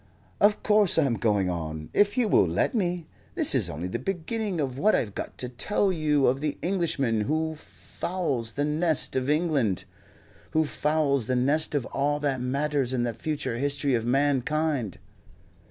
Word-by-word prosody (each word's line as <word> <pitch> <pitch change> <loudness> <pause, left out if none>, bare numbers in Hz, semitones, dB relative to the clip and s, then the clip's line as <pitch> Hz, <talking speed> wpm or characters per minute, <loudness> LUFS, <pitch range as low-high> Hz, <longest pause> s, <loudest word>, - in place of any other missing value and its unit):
"Of 205 +1 +3
course 210 -5 +4
I'm 140 -6 +3
going 105 -3 +1
on, 80 -3 -5
if 205 +3 +3
you 245 -3 +3
will 95 - +4
let 85 - 0
me. 180 -6 -1 0.3
This - - +5
is - - +2
only 80 +5 -4
the 90 - -4
beginning 195 +1 -3
of 135 -3 -2
what 215 +6 +4
I've 105 -4 -1
got - - -6
to 125 - -3
tell 190 +10 0
you 150 -5 +1
of 130 +3 +1
the 150 -1 -2
Englishman 155 - 0
who 160 +7 -1
fouls 150 -7 -4
the 145 +4 -1
nest 155 +1 0
of 130 +1 -1
England 150 - +1 0.7
who 160 0 +3
fouls 145 -5 0
the 130 - 0
nest 145 +5 +1
of 135 -4 0
all 145 +2 -1
that 135 -3 0
matters 140 0 -1
in 125 -2 0
the 120 -1 -1
future 145 -4 -3
history 140 0 0
of 115 -2 +1
mankind." 140 - 0
145 Hz, 170 wpm, -26 LUFS, 125-160 Hz, 0.7 s, This